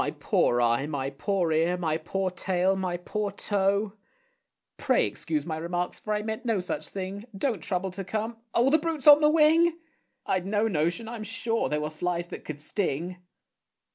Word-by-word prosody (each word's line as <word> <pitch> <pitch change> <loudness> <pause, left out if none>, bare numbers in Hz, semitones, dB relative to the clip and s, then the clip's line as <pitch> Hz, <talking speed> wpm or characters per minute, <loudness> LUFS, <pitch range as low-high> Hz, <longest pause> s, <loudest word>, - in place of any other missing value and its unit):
My - - 0
poor 120 - +1
eye! 120 +4 +2
my 140 -3 -3
poor 175 +4 0
ear! 165 +3 +2
my 160 -3 0
poor 185 +3 -2
tail! 185 +1 +1
my 185 -2 -2
poor 210 +4 -3
toe! 200 +1 0 0.8
Pray - - +2
excuse 305 -2 -3
my 160 -2 -3
remarks, 175 +2 -3
for 215 - -5
I 210 - -2
meant 220 +2 -4
no 225 -5 +1
such 180 - -3
thing. 195 +2 -6
Don't 225 - -1
trouble 185 +3 -2
to 195 +2 -5
come 220 +4 -3 0.2
oh, 245 +3 +4
the 315 - +5
brute's 320 -3 -2
on 295 0 +9
the 300 - +6
wing! 325 +2 +4 0.5
I'd 185 0 0
no 210 +2 +1
notion, 175 +4 -1
I'm 230 -1 -6
sure, 225 +1 -1
there 150 0 0
were 150 0 -3
flies 170 +2 -2
that - - -8
could 155 -2 -6
sting. 175 +1 -2
190 Hz, 185 wpm, -27 LUFS, 170-225 Hz, 0.8 s, on